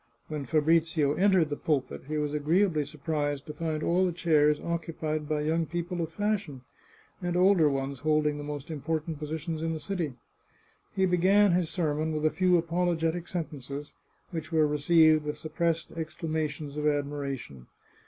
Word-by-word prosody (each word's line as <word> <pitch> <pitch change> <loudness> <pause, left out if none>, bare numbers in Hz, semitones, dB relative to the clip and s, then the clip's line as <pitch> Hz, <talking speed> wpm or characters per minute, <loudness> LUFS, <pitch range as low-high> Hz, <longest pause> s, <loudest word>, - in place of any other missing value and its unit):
When 150 -3 -4
Fa 155 +4 +3
brizio 160 -2 +3
entered 185 -5 +3
the - - 0
pulpit 145 -4 -2
he 155 +1 -2
was 150 -1 -1
agreeably 155 +1 +2
surprised 145 -1 -2
to 150 - -7
find 155 0 -3
all 180 +2 +2
the 185 - +2
chairs 150 -3 +3
occupied 160 -2 -3
by 150 -1 0
young 160 +2 0
people 175 +2 -3
of 165 -1 -3
fashion, 205 -8 -2 0.6
and 175 0 -1
older 180 -4 +5
ones 135 -1 -2
holding 150 -1 +1
the - - -5
most 145 +1 -6
important 155 +1 -3
positions 155 +1 -4
in 165 0 -1
the 160 - -4
city. 160 -4 -3 0.8
He 190 - +3
began 190 +3 +4
his 175 -2 +1
sermon 155 -2 -1
with 155 0 -1
a 155 - +4
few 180 0 +4
apologetic 170 0 0
sentences, 145 -4 -5 0.4
which 160 -2 -5
were 160 -2 +4
received 155 +1 +4
with 150 0 -4
suppressed 165 +1 -1
exclamations 155 -2 -4
of 150 0 0
admiration. 140 - -3
155 Hz, 165 wpm, -28 LUFS, 150-170 Hz, 0.8 s, older